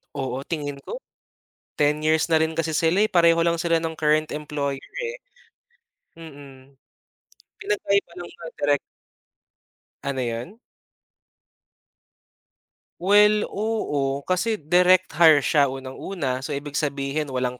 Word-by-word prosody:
Oo 135 Hz, -2 st, -3 dB
tingin 145 Hz, -4 st, -4 dB
ko, -, -, -8 dB, 0.7 s
10 150 Hz, 0 st, +2 dB
years 160 Hz, +1 st, +2 dB
na 160 Hz, -, +5 dB
rin 160 Hz, 0 st, 0 dB
kasi 165 Hz, 0 st, -1 dB
sila 165 Hz, +5 st, +2 dB
eh, 215 Hz, -, +1 dB
pareho 170 Hz, -1 st, +4 dB
lang 170 Hz, 0 st, +1 dB
sila 165 Hz, -1 st, +1 dB
ng 160 Hz, -1 st, -4 dB
current 155 Hz, 0 st, +2 dB
employer 145 Hz, -2 st, -4 dB
eh. 475 Hz, +1 st, -4 dB, 1.0 s
Mm. 140 Hz, -4 st, -13 dB, 0.9 s
Pinagkaiba 290 Hz, -, 0 dB
ng 175 Hz, -, -7 dB
mga 165 Hz, -1 st, -10 dB
direk 145 Hz, -1 st, +1 dB, 1.2 s
Ano 140 Hz, -1 st, -3 dB
yun? 120 Hz, -, -5 dB, 2.4 s
Well, 210 Hz, +3 st, +5 dB
oo, 145 Hz, -11 st, -2 dB
kasi 215 Hz, +5 st, 0 dB
direct 180 Hz, +3 st, +3 dB
hire 155 Hz, -4 st, +7 dB
siya 145 Hz, -2 st, +3 dB
unang-una, 135 Hz, +2 st, -4 dB
so 140 Hz, +2 st, -4 dB
ibig 145 Hz, +1 st, -4 dB
sabihin 145 Hz, 0 st, -2 dB
walang 125 Hz, -2 st, -3 dB
155 Hz, 120 wpm, -23 LUFS, 140-175 Hz, 2.4 s, hire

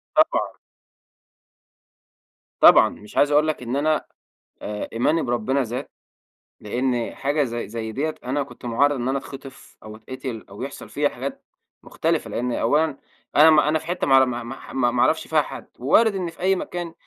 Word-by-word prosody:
طبعًا. -, -, +2 dB, 2.0 s
طبعًا، -, -, +8 dB
مش 105 Hz, -, -12 dB
عايز 145 Hz, +1 st, +4 dB
أقول 150 Hz, +1 st, +4 dB
لك 155 Hz, -5 st, -2 dB
إن 120 Hz, +2 st, -3 dB
أنا 155 Hz, +2 st, +1 dB, 0.6 s
آآ، 105 Hz, 0 st, -5 dB
إيماني 150 Hz, +8 st, +1 dB
بربنا 120 Hz, +3 st, 0 dB
زاد 125 Hz, +4 st, -5 dB, 0.7 s
لأن 120 Hz, +2 st, -2 dB
حاجة 145 Hz, +2 st, 0 dB
زي 120 Hz, -5 st, -4 dB
زي 110 Hz, 0 st, -5 dB
ديّة 155 Hz, +7 st, -2 dB
أنا 135 Hz, +3 st, -1 dB
كنت 125 Hz, -1 st, -14 dB
مُعرّض 140 Hz, +5 st, +2 dB
إن 120 Hz, -1 st, -3 dB
أنا 135 Hz, -, 0 dB
أتخطف، 135 Hz, +1 st, -11 dB
أو 110 Hz, 0 st, -9 dB
اتقتل 120 Hz, 0 st, -7 dB
أو -, -, -10 dB
يحصل -, -, -7 dB
فيّا -, -, 0 dB
حاجات -, -, -7 dB, 0.4 s
مختلفة، -, -, -1 dB
لأن 125 Hz, +1 st, -2 dB
أولًا 150 Hz, +6 st, +1 dB, 0.4 s
أنا 155 Hz, +2 st, +8 dB
ما 150 Hz, -1 st, +5 dB
أنا 155 Hz, +1 st, +2 dB
في -, -, -13 dB
حتّة 175 Hz, +1 st, -2 dB
ما 135 Hz, -, +3 dB
أعر 135 Hz, 0 st, +7 dB
ما 120 Hz, -1 st, -4 dB, 0.3 s
ما 125 Hz, -2 st, +2 dB
ما 120 Hz, 0 st, 0 dB
اعرفش -, -, +2 dB
فيها -, -, +3 dB
حد، -, -, -9 dB
ووارد 200 Hz, -, +3 dB
إن 180 Hz, -3 st, -2 dB
في 165 Hz, -, -16 dB
أي 190 Hz, +2 st, +2 dB
مكان 175 Hz, -2 st, -5 dB
135 Hz, 175 wpm, -23 LUFS, 120-155 Hz, 2.0 s, طبعًا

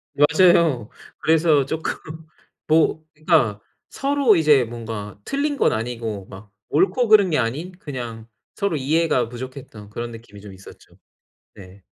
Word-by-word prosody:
맞아요. 150 Hz, -, +4 dB, 0.3 s
그래서 155 Hz, -3 st, +3 dB
쪼끔 160 Hz, +3 st, -3 dB, 0.7 s
뭐 160 Hz, 0 st, +2 dB
그러니까 150 Hz, -, +1 dB, 0.3 s
서로 275 Hz, -6 st, +2 dB
이제 150 Hz, -5 st, +4 dB
뭔가 110 Hz, -3 st, -7 dB
틀린 285 Hz, +1 st, -1 dB
건 -, -, +2 dB
아니고 110 Hz, -3 st, -4 dB
막 100 Hz, +1 st, -13 dB, 0.2 s
옳고 195 Hz, -, +2 dB
그른 205 Hz, -4 st, +6 dB
게 150 Hz, -, +2 dB
아닌 140 Hz, +10 st, -3 dB
그냥 120 Hz, -, -7 dB, 0.3 s
서로 200 Hz, -5 st, -1 dB
이해가 140 Hz, -4 st, +1 dB
부족했던 125 Hz, -4 st, -9 dB
그런 120 Hz, +2 st, -6 dB
느낌이 115 Hz, -3 st, -12 dB
좀 100 Hz, -2 st, -11 dB
있었죠. 95 Hz, +1 st, -16 dB, 0.6 s
네. 95 Hz, 0 st, -15 dB
130 Hz, 270 characters per minute, -22 LUFS, 110-165 Hz, 0.7 s, 그른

